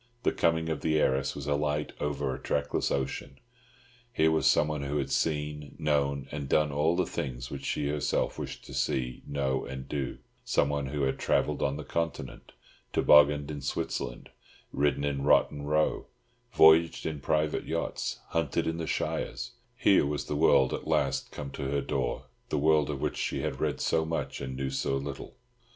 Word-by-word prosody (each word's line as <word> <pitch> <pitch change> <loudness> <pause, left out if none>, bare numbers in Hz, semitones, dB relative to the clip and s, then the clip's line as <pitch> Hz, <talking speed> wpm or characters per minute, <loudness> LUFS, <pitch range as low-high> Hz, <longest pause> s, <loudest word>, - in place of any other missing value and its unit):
The - - +3
coming 80 0 +1
of 80 -3 -2
the 80 -1 +2
heiress 65 -2 +1
was 70 -1 -6
as 75 - +2
light 75 0 -1
over 75 -3 -1
a - - -6
trackless 70 0 -1
ocean. 70 0 -3 0.7
Here 80 -8 +3
was 80 - +2
someone 75 -1 +3
who 70 +1 -2
had 70 -2 -2
seen, 75 -2 -1
known, 70 -3 0
and 70 -2 -5
done 75 -1 +3
all 75 +4 +2
the 90 - +1
things - - -4
which 70 -1 -6
she 70 +1 -1
herself 75 -1 -1
wished - - -6
to - - -10
see, 60 -1 -1
know, 65 -2 -1
and 65 +1 -7
do; 70 -3 -3 0.3
someone 70 -1 +1
who 70 +1 -2
had 65 - 0
travelled - - +1
on 70 +1 0
the 75 - -5
Continent, 80 -6 -4 0.4
tobogganed 75 0 +5
in 75 -1 -5
Switzerland, - - -3 0.4
ridden 70 0 +1
in 70 -1 -1
Rotten 70 0 +3
Row, 75 +1 +1 0.4
voyaged 80 -2 +6
in 80 -2 -3
private 75 +2 0
yachts, - - -2
hunted 80 -5 0
in 80 0 -1
the 80 -1 -3
shires; 65 -2 -2 0.3
here - - +4
was 75 -1 -2
the 75 - -3
world 70 -4 +4
at - - -5
last 70 -1 0
come 70 -2 -6
to 65 - -4
her 70 0 +1
door—the 65 -4 -3
world 75 0 +3
of 70 -2 -3
which - - -1
she - - -1
had - - -3
read - - 0
so 80 - +1
much 80 -2 -3
and 65 -1 -4
knew 70 0 -2
so 70 0 0
little. 70 0 -6
70 Hz, 180 wpm, -29 LUFS, 70-75 Hz, 0.7 s, voyaged